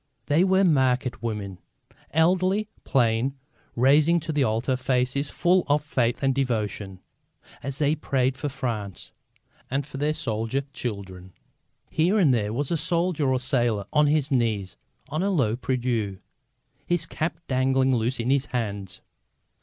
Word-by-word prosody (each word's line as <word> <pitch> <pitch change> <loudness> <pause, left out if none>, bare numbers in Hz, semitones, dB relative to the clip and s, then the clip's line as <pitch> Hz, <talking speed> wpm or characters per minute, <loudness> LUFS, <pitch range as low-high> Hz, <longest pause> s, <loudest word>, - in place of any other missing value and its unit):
They 155 +5 +3
were 190 0 +3
market 130 - +2
women, 105 -5 -4 0.5
elderly, 185 +6 +2 0.2
plain, 125 +1 +1 0.4
raising 145 +7 +4
to 160 +1 -4
the 145 -2 +2
altar 120 +3 0
faces 130 +2 0
full 180 +1 +2
of 145 0 +2
faith 125 -3 0
and 135 -1 +3
devotion, 105 -7 -2 0.6
as 135 +1 -5
they 145 0 +2
prayed 135 -4 0
for 145 +2 -3
France 115 -8 -5 0.6
and 135 +1 -1
for 145 -1 -9
their 150 +2 0
soldier 115 +2 -2
children. 95 -7 -6 0.6
Here 175 +7 +2
and 160 -10 +4
there 105 -3 0
was 135 +6 -2
a 170 - +2
soldier 165 -1 0
or 130 - +2
a - - 0
sailor 120 -6 0
on 150 -1 +4
his 150 0 +1
knees 110 -7 0 0.3
on 155 +3 -2
a 195 - +1
low 130 - +1
prie 130 +1 -1
dieu, 115 -6 -1 0.7
his 175 -2 0
cap 160 0 -3
dangling 130 0 +2
loose 120 +2 -1
in 120 +3 0
his 140 0 +2
hands. 100 -6 -4
130 Hz, 155 wpm, -25 LUFS, 115-150 Hz, 0.7 s, raising